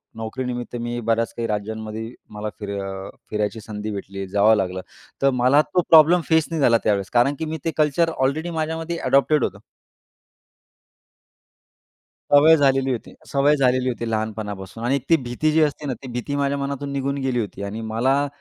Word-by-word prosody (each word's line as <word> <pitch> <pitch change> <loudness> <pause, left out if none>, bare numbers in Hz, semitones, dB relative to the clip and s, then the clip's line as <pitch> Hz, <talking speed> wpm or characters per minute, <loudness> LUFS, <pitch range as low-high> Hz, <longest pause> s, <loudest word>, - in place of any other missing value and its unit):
नोकरीनिमित्त 120 +2 -5
मी 120 0 -3
बऱ्याच 115 0 +1
काही 115 0 -2
राज्यांमध्ये 110 +2 -4 0.2
मला 105 0 -4
फिर 105 -1 -6
अ, 95 0 -6 0.2
फिरायची 105 +1 -1
संधी 105 0 -6
भेटली, 95 -1 -6
जावं 105 +3 +4
लागलं. 95 -2 -2 0.4
तर 135 - +5
मला 135 +4 +5
तो 180 - 0
प्रॉब्लेम 165 +2 +7
फेस 160 -1 +4
नाही 160 -3 -1
झाला 120 -3 +5
त्यावेळेस 100 -2 +1
कारण 125 +4 +3
की 160 - -2
मी 160 +1 -4
ते 165 - +1
कल्चर 155 +2 +2
ऑलरेडी 145 +6 0
माझ्यामध्ये 160 +1 -3
अडॉप्टेड 140 +3 +2
होतं. - - -2 2.7
सवय 155 +3 +8
झालेली 135 -1 +2
होती. 120 - -5
सवय 145 +2 +3
झालेली 130 -1 +2
होती 115 -2 -3
लहानपणापासून 110 -1 -4
आणि 135 +3 +2
ती 165 - +7
भीती 125 +6 0
जी 160 +1 +3
असते 150 0 -2
ना, 130 - -1
ती 130 +3 -10
भीती 125 +4 -3
माझ्या 140 0 0
मनातून 140 0 -4
निघून 140 0 -1
गेली 130 -2 0
होती 105 -2 -4
आणि 105 +3 -5
मला 130 +6 +1
125 Hz, 170 wpm, -22 LUFS, 110-145 Hz, 2.7 s, सवय